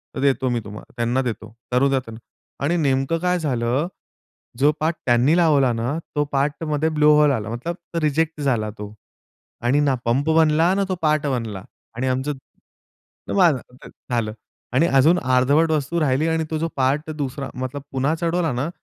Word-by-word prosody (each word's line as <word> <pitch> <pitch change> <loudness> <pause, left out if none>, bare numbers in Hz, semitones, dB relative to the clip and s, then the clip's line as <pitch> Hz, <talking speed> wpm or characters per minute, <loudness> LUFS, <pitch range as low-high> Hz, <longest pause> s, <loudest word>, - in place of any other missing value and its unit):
तर - - -4
देतो 135 -2 +2
मी 120 -1 0
तुम्हाला 105 +1 -11
त्यांना 120 +3 +1
देतो 115 -3 -5 0.2
करू 130 +3 +3
द्या 135 -1 +2
त्यांना." 115 -2 -10 0.5
आणि 170 +4 +1
नेमकं 135 +1 +1
काय 180 0 +1
झालं, 130 +1 0 0.7
जो 145 +3 +5
पार्ट 160 +1 0
त्यांनी 120 +6 +4
लावला 145 -7 +4
ना, 120 +7 -2 0.2
तो 145 - +2
पार्टमध्ये 150 +2 0
ब्लो 150 -1 +3
होल 150 -1 +5
आला, 110 -4 -3
मतलब 125 +9 -4 0.2
तो 165 - 0
रिजेक्ट 155 +1 0
झाला 120 -7 0
तो 105 0 -8 0.7
आणि 135 +5 +3
ना 140 -2 +2
पंप 135 +6 +1
बनला, 160 +2 +4
ना 200 0 +1
तो 185 - 0
पार्ट 150 -1 +2
बनला 115 -8 -3 0.3
आणि 130 +2 -2
आमचं 130 +3 -1 1.0
जे - - -3
माझ 175 -6 +5
ते 125 +1 -13
झालं 115 -3 -4 0.4
आणि 160 +6 +4
अजून 155 +4 +4
अर्धवट 135 +5 +2
वस्तू 155 +3 0
राहिली 145 +1 +1
आणि 160 0 0
तो 160 - -1
जो 165 +1 -1
पार्ट 140 +4 0
दुसरा, 140 -2 -4
मतलब 130 +2 -5
पुन्हा 135 +4 +1
चढवला 170 -3 0
ना, 130 +6 -2
140 Hz, 180 wpm, -22 LUFS, 125-160 Hz, 1.0 s, जो